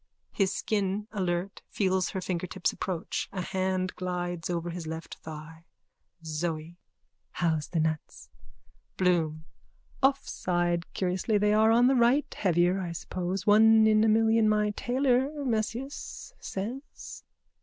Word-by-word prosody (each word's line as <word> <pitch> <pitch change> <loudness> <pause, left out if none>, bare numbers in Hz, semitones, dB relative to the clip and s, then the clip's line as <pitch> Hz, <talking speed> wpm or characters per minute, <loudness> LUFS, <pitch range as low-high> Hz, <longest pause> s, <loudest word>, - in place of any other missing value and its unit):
(His 195 -2 +1
skin, 205 0 -1
alert, 185 -1 -2
feels 190 -2 +1
her 190 - -4
fingertips 180 0 -2
approach. 180 -3 -3
A 185 - -3
hand 185 0 -1
glides 175 -2 -3
over 175 0 -2
his 170 -2 -6
left 160 +1 -6
thigh.) 160 +1 -10 0.6
ZOE: 160 +1 -3 0.6
How's 160 -3 0
the 165 - 0
nuts? 150 - -3 0.7
BLOOM: 160 -4 +1 0.6
Off 275 0 +2
side. 175 -1 -1
Curiously 185 +3 0
they 210 +1 +3
are 220 +1 +5
on 235 +2 +5
the 260 - +5
right. 250 +3 +3
Heavier, 180 0 +2
I 175 -3 -4
suppose. 180 +2 -4
One 220 +1 +6
in 215 0 +5
a - - +4
million 225 0 +4
my 210 0 +2
tailor, 255 +3 +1 0.2
Mesias, 240 - -3
says. 235 +9 -7
185 Hz, 130 wpm, -28 LUFS, 175-220 Hz, 0.7 s, One